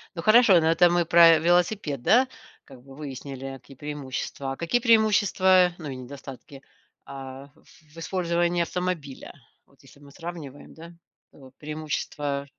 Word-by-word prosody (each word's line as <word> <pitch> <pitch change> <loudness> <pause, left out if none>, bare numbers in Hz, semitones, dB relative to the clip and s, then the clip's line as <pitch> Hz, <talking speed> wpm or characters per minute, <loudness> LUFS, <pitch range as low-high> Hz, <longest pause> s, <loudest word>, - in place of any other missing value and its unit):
Ну 165 - -5
хорошо, 215 +2 +5
это 170 +1 +4
мы 175 -1 +1
про 165 -1 +6
велосипед, 175 - 0
да, 255 - +4 0.4
как 130 -3 -16
бы 135 0 -15
выяснили 135 -2 -8
какие 135 +1 -17
преимущества. 140 -1 -6
А - - -4
какие 170 +9 0
преимущества, 205 -5 +3
ну 155 -3 -7
и 135 - -6
недостатки, 135 +1 -11 0.4
а, 135 0 -9
в 155 0 -23
использовании 175 0 -1
автомобиля, 170 -5 -4 0.3
вот 140 - -27
если 135 +1 -19
мы 140 -1 -16
сравниваем, 165 -4 -10
да, 165 +1 -12 0.4
то 135 -2 -17
преимущества 150 -2 -4
155 Hz, 140 wpm, -25 LUFS, 140-175 Hz, 0.4 s, про